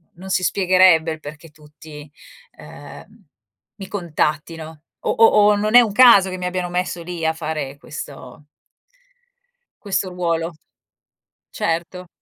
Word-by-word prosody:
non 190 Hz, +3 st, -11 dB
si 185 Hz, -1 st, 0 dB
spiegherebbe 185 Hz, -4 st, +3 dB
il 155 Hz, -, -11 dB
perché 150 Hz, +2 st, -11 dB
tutti, 150 Hz, 0 st, -14 dB, 0.5 s
ehm, -, -, -14 dB, 0.5 s
mi 195 Hz, -3 st, -10 dB
contattino 160 Hz, -3 st, -4 dB, 0.2 s
o -, -, -2 dB
o 225 Hz, -, +4 dB, 0.3 s
o -, -, +2 dB
non 215 Hz, +2 st, -2 dB
è 245 Hz, -, +10 dB
un 225 Hz, -, -1 dB
caso 205 Hz, -4 st, +6 dB
che 185 Hz, -, -6 dB
mi 180 Hz, -, -6 dB
abbiano 180 Hz, 0 st, -3 dB
messo 180 Hz, 0 st, -3 dB
lì 170 Hz, -1 st, -6 dB
a 160 Hz, -, +1 dB
fare 155 Hz, -4 st, -5 dB
questo 145 Hz, -1 st, -10 dB, 1.4 s
questo 195 Hz, -2 st, -2 dB
ruolo. 170 Hz, -2 st, -3 dB, 1.0 s
Certo. 170 Hz, +2 st, -3 dB
170 Hz, 135 wpm, -20 LUFS, 155-185 Hz, 1.4 s, è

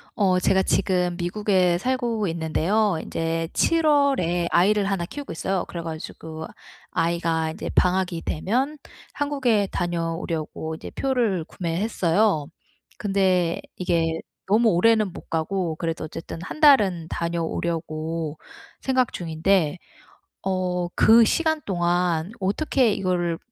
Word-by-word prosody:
어 185 Hz, -3 st, +3 dB
제가 190 Hz, +1 st, +3 dB
지금 180 Hz, -3 st, +1 dB
미국에 180 Hz, -1 st, +1 dB
살고 240 Hz, -3 st, -1 dB
있는데요 170 Hz, +4 st, +1 dB
인제 165 Hz, 0 st, -2 dB
7 330 Hz, -1 st, +2 dB
월에 265 Hz, -, +2 dB
아이를 200 Hz, +3 st, +3 dB
1 195 Hz, -3 st, -1 dB
키우고 285 Hz, +10 st, -7 dB
있어요. 185 Hz, +2 st, -1 dB
그래 170 Hz, -, -5 dB
가지고 160 Hz, 0 st, -7 dB, 0.5 s
아이가 165 Hz, -1 st, 0 dB
이제 160 Hz, -, -5 dB
방학이 180 Hz, -2 st, +1 dB
되면 250 Hz, -, -1 dB, 0.4 s
한국에 260 Hz, -8 st, +1 dB
다녀오려고 165 Hz, -2 st, -3 dB
이제 -, -, -9 dB
표를 235 Hz, -10 st, 0 dB
구매했어요. 180 Hz, -1 st, 0 dB, 0.5 s
근데 190 Hz, -4 st, +1 dB, 0.2 s
이게 165 Hz, -2 st, 0 dB, 0.3 s
너무 220 Hz, +4 st, +4 dB
오래는 215 Hz, +1 st, +3 dB
못 -, -, -12 dB
가고 165 Hz, +1 st, -1 dB
그래도 165 Hz, -1 st, -3 dB
어쨌든 160 Hz, +2 st, -7 dB
1 245 Hz, -, -7 dB
달은 200 Hz, -, +5 dB
다녀오려고 165 Hz, -2 st, -3 dB, 0.4 s
생각 260 Hz, -2 st, +1 dB
중인데 170 Hz, 0 st, 0 dB, 0.7 s
어 180 Hz, -2 st, -1 dB
그 230 Hz, +1 st, +7 dB
시간 315 Hz, +6 st, +1 dB
동안 175 Hz, -1 st, 0 dB
어떻게 225 Hz, +4 st, +1 dB
이거를 175 Hz, -3 st, -1 dB
180 Hz, 260 characters per minute, -24 LUFS, 165-210 Hz, 0.7 s, 그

